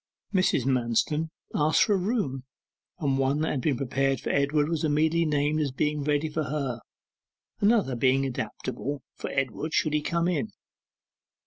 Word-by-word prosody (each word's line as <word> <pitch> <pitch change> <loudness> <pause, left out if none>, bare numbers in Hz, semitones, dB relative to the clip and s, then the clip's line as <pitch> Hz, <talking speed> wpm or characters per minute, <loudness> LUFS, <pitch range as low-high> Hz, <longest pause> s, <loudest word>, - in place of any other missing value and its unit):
Mrs. 185 -9 +2
Manston 130 +5 +1 0.2
asked 155 +1 +3
for 210 - +2
a - - +3
room, 180 - -1 0.5
and 140 -6 0
one 135 +3 +1
that 160 - 0
had 135 - -1
been 135 -1 +1
prepared 135 0 0
for - - -3
Edward 145 +1 +2
was 165 -1 -1
immediately 160 +2 +2
named 150 0 +1
as 145 -3 0
being 150 +2 -1
ready 150 +1 +1
for 155 0 -2
her, 135 -4 -2 0.8
another 205 - +3
being 135 +2 +2
adaptable 130 +3 -4
for - - -6
Edward, 135 +3 -2
should 155 - +2
he 150 - +2
come 170 +2 0
in. 155 -10 0
145 Hz, 160 wpm, -27 LUFS, 135-155 Hz, 0.8 s, asked